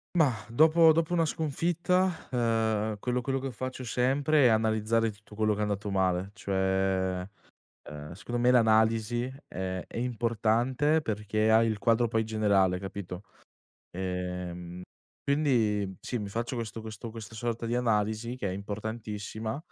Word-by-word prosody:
Mah, 140 -9 +2
dopo 160 +5 +6
dopo 165 +2 +1
una 165 -1 +3
sconfitta, 170 +4 0
uhm, 110 -3 +1
quello 125 +2 -1
quello 135 +1 -1
che 135 -2 -5
faccio 130 +2 -5
sempre, 135 +5 +2
è - - +7
analizzare 110 +1 +2
tutto 105 0 -13
quello 110 0 +2
che 105 - -5
è - - 0
andato 105 0 -2
male: 95 0 0
cioè, 95 -1 0 0.6
uhm, 75 +1 -8
secondo 120 +6 -4
me 125 +1 +4
l'analisi, 110 0 +3 0.2
ehm, 95 0 -4
è - - -8
importante 120 +5 +1
perché 110 -1 0
hai 110 +1 +5
il 110 -2 -1
quadro 115 +1 +3
poi 110 0 +1
generale 100 -4 +2
capito? 95 -1 -7 0.7
Ehm, 90 -1 -5 0.4
quindi 110 - +1
sì, 125 - -4
mi 105 - -4
faccio 115 +4 -3
questo 115 -1 -5
questo 110 +1 -7
questa 110 -1 -9
sorta 115 0 -3
di 115 +1 -1
analisi, 115 0 0
che 100 -6 -3
è - - -3
importantissima, 110 +3 -5
110 Hz, 145 wpm, -29 LUFS, 100-125 Hz, 0.7 s, è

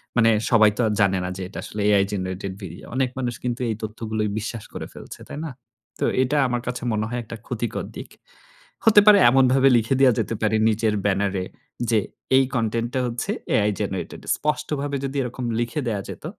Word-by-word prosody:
মানে 115 -1 +5 0.2
সবাই 110 -3 +6
তো - - +1
আর 105 - 0
জানে 95 -1 +3
না, 90 - -3
যে 95 - -6
এটা 95 - -8
আসলে 105 - -5
AI 100 -1 +5
জেনারেটেড 95 0 -3
ভিডিও। 85 -2 -9
অনেক 130 -1 +1
মানুষ 125 -2 -1
কিন্তু 125 0 -2
এই 110 - -1
তথ্যগুলোয় 110 -1 -3
বিশ্বাস 110 0 -5
করে - - -5
ফেলছে। - - -10
তাই - - -7
না? - - -4 0.5
তো - - +1 0.2
এটা 135 +4 0
আমার 120 -1 -1
কাছে 125 0 -3
মনে 110 0 0
হয় 120 +1 -2
একটা 115 - -8
ক্ষতিকর 120 -2 -3
দিক। - - -8 0.8
হতে 210 -2 +8
পারে 210 -1 +9
এমনভাবে 135 +1 +5
লিখে 115 +4 +1
দেওয়া 130 -3 +6
যেতে 115 - -1
পারে। 110 0 +2
নিজের 110 0 +1
ব্যানারে 100 -1 +1 0.5
যে, 110 - +4 0.4
"এই 135 - +6
কনটেন্ট 115 0 0
টা - - +2
হচ্ছে, 120 -1 -3 0.2
AI 105 0 +3
জেনারেটেড।" - - -4 0.2
স্পষ্টভাবে 150 -1 -2
যদি 135 +1 -4
এরকম 125 0 -5
লিখে 120 +5 -1
দেওয়া 105 -4 -1
যেত - - -8
115 Hz, 195 wpm, -23 LUFS, 105-130 Hz, 0.8 s, পারে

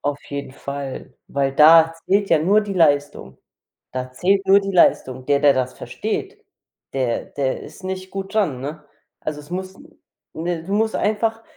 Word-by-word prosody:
Auf 145 0 -2
jeden 140 -2 -6
Fall, 140 -2 -7
weil 135 -1 -1
da 160 +2 +7
zählt 200 +1 +2
ja 165 - +5
nur 205 +5 +4
die 205 -1 -5
Leistung. 145 - +1 0.6
Da 130 0 -4
zählt 195 +8 +1
nur 195 +1 +6
die 195 0 -4
Leistung. 130 -7 +3
Der, 140 +1 +2
der 145 -1 +5
das 130 -1 -1
versteht, - - -5 0.5
der 130 -3 -1
der 135 -2 -1
ist - - -13
nicht 185 0 -5
gut 195 +1 -6
dran, 180 -13 +1
ne? 150 +3 -6 0.4
Also, 150 -1 -4
es 145 +2 -13
muss 185 +1 -5 0.6
ne? 165 0 -3
Du 195 +4 -4
musst 220 +1 +1
einfach 225 +1 0
160 Hz, 170 wpm, -21 LUFS, 140-195 Hz, 0.6 s, da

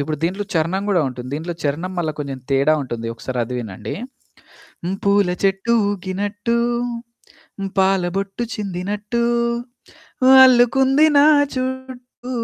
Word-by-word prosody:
ఇప్పుడు 150 +2 -2
దీంట్లో 190 +4 -1
చరణం 165 +4 0
గూడా 180 -5 +3
ఉంటుంది. 125 -1 -8
దీంట్లో 165 +3 -4
చరణం 160 +6 -2
మల్ల 165 -3 0
కొంచెం 140 -2 -5
తేడా 140 +3 +3
ఉంటుంది. 115 -3 -5
ఒకసారి 125 +2 -6
అది 125 +2 -6
వినండి. 105 -6 -6 0.9
హ్మ్, 185 +3 -2
పూల 200 -1 +3 0.2
చెట్టు 195 +4 +1 0.2
ఊగినట్టు, 205 +3 -2 1.2
పాల 190 0 +3
బొట్టు 195 +3 -3
చిందినట్టు, 205 +3 -3 1.2
అల్లుకుంది 265 +4 +4
నా 285 - +7 0.3
చుట్టూ 255 -1 -6
195 Hz, 115 wpm, -20 LUFS, 155-235 Hz, 1.2 s, నా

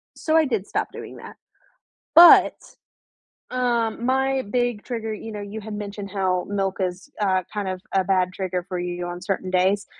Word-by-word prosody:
So, 315 0 -1
I 315 - +4
did 225 -7 -2
stop - - -2
doing - - -9
that. - - -11 0.8
But, 345 0 +9 1.0
um, 240 -2 0
my 265 +1 +1
big 245 -3 0
trigger, 225 -3 -4
you 220 +1 -7
know, 210 -1 -6
you 205 +2 -7
had 215 0 -7
mentioned 205 -1 -6
how 185 -2 0
milk 195 -1 -1
is, 185 +7 -3
uh, 185 -2 +2
kind 205 -2 -3
of 185 0 -5
a 190 -1 +3
bad 185 -1 +1
trigger 185 -2 -3
for 180 -1 -3
you 175 0 -4
on 175 0 -6
certain 190 -2 -3
days. 190 +3 +2
200 Hz, 180 wpm, -23 LUFS, 185-230 Hz, 1.0 s, But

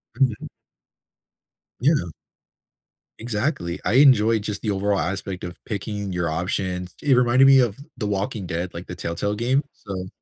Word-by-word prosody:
Mhm. 130 -6 0 1.3
Yeah. 135 - +2 1.1
Exactly. 110 - -2
I - - 0
enjoyed 115 -5 +5
just 105 -1 -4
the 110 - -2
overall 100 0 0
aspect 95 -1 -3
of 90 -1 -6
picking 100 -1 -4
your 85 -2 -1
options. 90 +2 -2
It 140 -3 +4
reminded 125 +1 +5
me 135 -1 +8
of 120 -5 +1 0.2
The 115 - -3
Walking 100 0 -2
Dead, 85 +1 -3
like, 85 +2 -7
the 90 - -6
Telltale 85 +5 -2
game. 130 +6 +1
So 95 -3 -6
105 Hz, 145 wpm, -23 LUFS, 90-120 Hz, 1.3 s, me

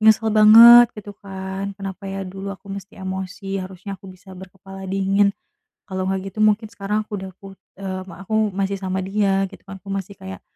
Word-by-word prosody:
nyesel 220 0 +4
banget 230 +3 +9
gitu 205 -1 -9
kan, 195 0 -6
kenapa 195 0 -7
ya 195 0 -4
dulu 195 +2 -6
aku 195 0 -14
mesti 195 0 -9
emosi 190 +1 -5
harusnya 190 +1 -8
aku 195 - -15
bisa 185 +1 -16
berkepala 190 +1 -11
dingin. 195 +1 +1 0.5
Kalau 185 -1 -4
nggak 190 0 -3
gitu 215 - -8
mungkin 215 +1 +3
sekarang 210 +1 -3
aku 210 - -12
udah 190 0 -7
put 195 -1 -12 0.2
eee, 190 -1 -5
ma 175 +3 -11
aku 215 +1 +1
masih 195 0 -1
sama 190 0 -2
dia 195 -1 +1
gitu - - -14
kan, 195 0 -9
aku - - -59
masih 195 0 -5
kayak 190 0 -9
195 Hz, 195 wpm, -21 LUFS, 190-205 Hz, 0.5 s, banget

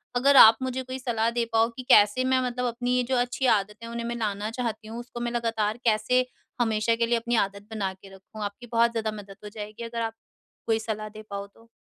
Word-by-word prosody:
अगर 275 +3 +4
आप 220 -2 +10
मुझे 260 0 -2
कोई 260 +1 -6
सलाह 230 -3 0
दे 235 0 0
पाओ 225 +1 +4
कि 255 - -5
कैसे 210 +5 +6
मैं 260 0 +2
मतलब 250 0 -2
अपनी 245 +1 -1
ये 250 - +2
जो 260 - +2
अच्छी 245 +2 0
आदतें 210 +3 -4
उन्हें 235 0 -5
मैं 235 - -3
लाना 210 -2 -2
चाहती 225 -2 -4
हूँ, 230 +2 -6
उसको 240 0 -8
मैं 240 0 -2
लगातार 225 -2 -1
कैसे 230 +3 +3 0.4
हमेशा 225 0 +2
के 230 0 +1
लिए 235 0 +2
अपनी 235 +1 -1
आदत 200 +1 -14
बना 195 -3 -2
के 190 +1 -16
रखूँ? 205 +3 -12
आपकी 205 +4 -6
बहुत 235 0 +3
ज़्यादा 220 -2 -2
मदद 195 -1 -13
हो 210 - -7
जाएगी 210 +1 -8
अगर 230 0 -4
आप 225 -1 -2 0.5
कोई 225 -1 +2
सलाह 215 -1 -4
दे 215 0 -11
पाओ 200 0 -4
तो। 225 +3 -23
230 Hz, 235 wpm, -26 LUFS, 215-240 Hz, 0.5 s, आप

